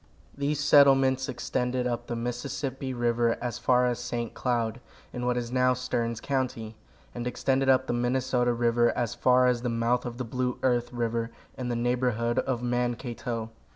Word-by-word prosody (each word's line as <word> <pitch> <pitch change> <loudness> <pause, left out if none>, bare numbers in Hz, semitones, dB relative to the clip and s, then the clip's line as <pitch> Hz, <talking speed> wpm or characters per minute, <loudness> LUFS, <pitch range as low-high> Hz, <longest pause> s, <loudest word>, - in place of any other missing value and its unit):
These 145 +1 -1
settlements 135 -2 +5
extended 125 0 -2
up 120 -1 -2
the 120 - -3
Mississippi 130 +3 -4
river 120 -1 +1
as 120 -2 -4
far 125 -1 +3
as 125 -1 0
St. 120 -1 -4
Cloud, 120 -1 -1 0.3
in 125 0 -3
what 125 0 +1
is 120 -1 -3
now 125 0 +3
Stearns 115 -2 -2
county, 125 -5 -2 0.4
and 120 0 -4
extended 135 +2 +1
up 130 0 +4
the - - -2
Minnesota 125 0 +1
river 120 0 +2
as 120 -1 -1
far 125 +1 +4
as 125 -1 +2
the 125 - -1
mouth 115 +1 +1
of 120 0 -6
the 130 - -3
Blue 125 +1 -2
Earth 120 -2 +1
river, 115 -1 -1 0.3
in 125 - -4
the 120 - -1
neighborhood 120 -1 0
of 125 -2 -2
Mankato. 120 -1 -2
125 Hz, 170 wpm, -27 LUFS, 120-130 Hz, 0.4 s, settlements